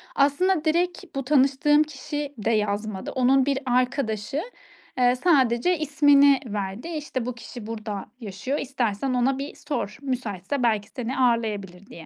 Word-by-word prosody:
Aslında 310 +5 +2
direkt 345 +4 +1
bu 275 - -2
tanıştığım 280 +2 +4
kişi 295 0 -5
de 220 +2 -1
yazmadı. 210 -2 -1
Onun 260 +1 +3
bir 275 -1 0
arkadaşı, 250 0 0 0.6
eee, 250 0 +4
sadece 270 +1 +3
ismini 285 -2 +5
verdi: 205 - -4
"İşte, 295 -7 -4
bu 250 -1 -4
kişi 235 -1 -9
burada 215 -3 -5
yaşıyor, 220 +6 -4
istersen 255 -2 -1
ona 255 +2 +1
bir 280 - -6
sor. 245 -8 -4
Müsaitse 250 -2 -3
belki 215 -3 +1
seni 250 0 -4
ağırlayabilir." 210 -7 0
diye. 165 -1 -11
255 Hz, 140 wpm, -25 LUFS, 220-285 Hz, 0.6 s, ismini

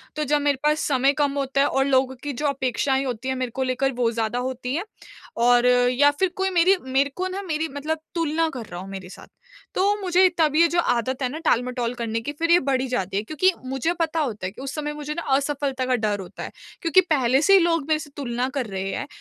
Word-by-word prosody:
तो 305 - -1
जब 295 +1 +1
मेरे 285 -2 +1
पास 300 +1 +2
समय 275 0 +3
कम 285 -1 +2
होता 275 0 0
है 285 - +4
और 270 0 +1
लोगों 260 -1 +2
की 290 -1 -3
जो 295 +5 -4
अपेक्षाएँ 265 0 0
होती 245 0 -4
हैं 260 - 0
मेरे 255 -2 -3
को 265 - 0
लेकर 260 +1 0
वो 230 -1 +2
ज़्यादा 230 +1 -1
होती 255 +1 -3
है। 345 - -1 0.6
और 245 +1 +4
या 250 +3 +4
फिर 380 -1 +3
कोई 380 0 0
मेरी 365 +2 +4
मेरे 265 +2 +1
को 370 +1 -2
ना 380 +2 -4
मेरी 320 -3 -2
मतलब 310 +2 -2 0.2
तुलना 325 0 +1
कर 240 -4 -6
रहा 175 -2 -8
हो 190 - -8
मेरे 190 -2 -8
साथ। - - -12 0.5
तो 405 +2 +3
मुझे 370 0 +4
तब 305 -2 +2
ये 335 +1 +6
जो 345 +1 0
आदत 255 -2 0
है - - +2
ना 300 - -6
टाल-मटोल 245 0 0
करने 230 -1 -2
की 290 - -4
फिर 335 0 +1
ये 350 - +7
बढ़ 260 -1 +2
ही 265 - -2
जाती 195 -6 -2
है 210 - -1
क्योंकि 310 +9 +2
मुझे 270 +6 -1
पता 325 0 0
होता 215 -10 -2
है 185 - -3
कि 240 - -12
उस 275 - -5
समय 295 -1 -3
मुझे 300 0 -5
ना 340 - -4
असफलता 275 -2 -1
का 255 0 +2
डर 210 -3 -1
होता 185 - -8
है। - - -7 0.3
क्योंकि 360 +2 +5
पहले 270 -6 +2
से 395 +4 +4
ही 390 - +8
लोग 330 -4 +1
मेरे 310 -1 +2
से 300 -2 -9
तुलना 250 -2 -2
कर 255 - 0
रहे 195 0 -4
हैं 285 - -4
270 Hz, 255 wpm, -23 LUFS, 245-310 Hz, 0.6 s, ही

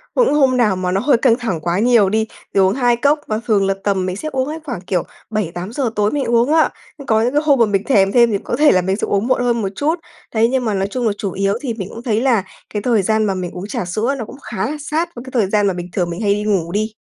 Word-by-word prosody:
cũng - - +3
hôm 270 -4 +3
nào 215 -6 +3
mà 185 0 -2
nó 190 +2 0
hơi 270 -1 +3
căng 235 -1 +3
thẳng 225 -10 -3
quá 175 +3 0
nhiều 225 -4 +4
đi, 220 +1 +1 0.3
thì 195 - +2
uống 190 0 +4
2 245 -1 +2
cốc, 285 +5 +2
và 215 0 -1
thường 200 -4 +2
là 195 - +2
tầm 195 -2 0
mình 185 0 -3
sẽ 310 +9 -5
uống 260 0 -1
á 310 - -4
khoảng, 245 - -5
kiểu, 180 -2 -1 0.3
7:00-8:00 215 - -2
tối 210 0 +1
mới 290 -2 -1
uống 240 +5 +2
á. 320 - +4 0.4
Có 220 -1 +3
những 240 +3 +1
cái 295 - +3
hôm 280 -4 +4
mà 230 - +6
mình 200 -2 0
thèm 195 -6 +3
thêm 235 -1 +4
thì 200 - +1
có - - -2
thể 300 0 +5
là 185 - +3
mình 190 +2 0
sẽ 210 - -2
uống 200 +3 0
muộn 255 - +2
hơn 235 -1 +1
một 195 - -1
chút. 315 - 0 0.4
Đấy, 225 +1 +3
nhưng 260 -2 0
mà 215 - 0
nói 195 0 0
chung 245 0 -1
là 210 - +1
chủ 200 -3 -3
yếu 195 +2 0
thì 260 -5 -3
mình 200 -4 -6
cũng 230 - -9
thấy 225 -2 0
là 240 -7 +2 0.3
cái 210 - -2
thời 230 -2 +2
gian 220 +3 +1
mà 200 - 0
mình 180 -2 -4
uống 185 +2 -7
trà 195 - -3
sữa 220 +10 -1
nó 230 - -4
cũng 265 - -11
khá 215 -3 -3
là 305 - -4
sát 315 +4 -2
với 240 - -8
cái 260 - -9
thời 220 -7 +1
gian 205 0 +2
mà 195 - +1
bình 175 0 -6
thường 175 -3 -1
mình 170 +5 -5
hay 205 -2 +2
đi 210 +1 -2
ngủ 190 -6 0
đi. 215 +3 -1
220 Hz, 305 wpm, -18 LUFS, 195-250 Hz, 0.4 s, mà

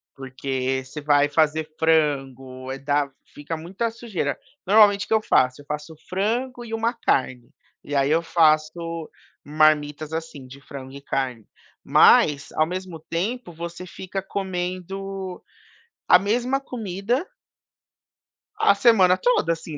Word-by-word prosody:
porque 130 0 -3
você 135 +4 -8
vai 145 0 +3
fazer 155 +1 +1
frango, 135 -5 0
eh, 135 - -4
dá, 145 +1 0 0.2
fica 145 +3 -5
muita 190 +8 -3
sujeira. 215 -11 -3 0.3
Normalmente, 205 0 +5
o - - -22
que - - 0
eu 220 - +3
faço? 130 -6 +2
Eu - - -18
faço 150 +2 -6
frango 240 +6 -2
e 225 - -8
uma 230 +2 0
carne. 130 - -1 0.3
E 145 - -5
aí, 140 +1 +2
eu 165 +1 +3
faço 165 0 +1 0.4
marmitas, 150 0 +2
assim, 160 -4 -6
de 135 +2 -13
frango 130 -2 -9
e 140 - -9
carne. 130 -5 -3 0.4
Mas, 145 0 +5
ao 155 - +2
mesmo 180 -2 -6
tempo, 180 +7 -3
você 170 +2 -7
fica 190 +2 -6
comendo 190 0 -5 0.7
a 180 - +8
mesma 245 +7 0
comida 235 - -3 1.3
A - - +5
semana 200 -5 +5
toda, 185 -5 +2
assim, 160 -2 -8
165 Hz, 135 wpm, -23 LUFS, 145-195 Hz, 1.3 s, a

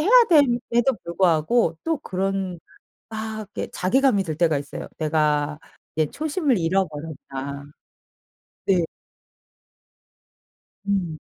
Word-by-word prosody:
해야 360 +9 +2 0.2
됨에도 255 - +4
불구하고 170 +2 +2
또 325 -3 0
그런 190 -3 -2 0.5
막 220 -1 -5
이렇게 - - -2
자괴감이 210 +1 +2
들 160 -4 -3
때가 160 -2 +2
있어요. 140 0 -6
'내가 150 -1 +1 0.4
이제 155 -1 +1
초심을 295 - 0
잃어버렸다.' 150 -5 -3 1.0
네. 180 -4 +3 2.0
음. 180 -6 0
185 Hz, 210 characters per minute, -24 LUFS, 155-235 Hz, 2.0 s, 됨에도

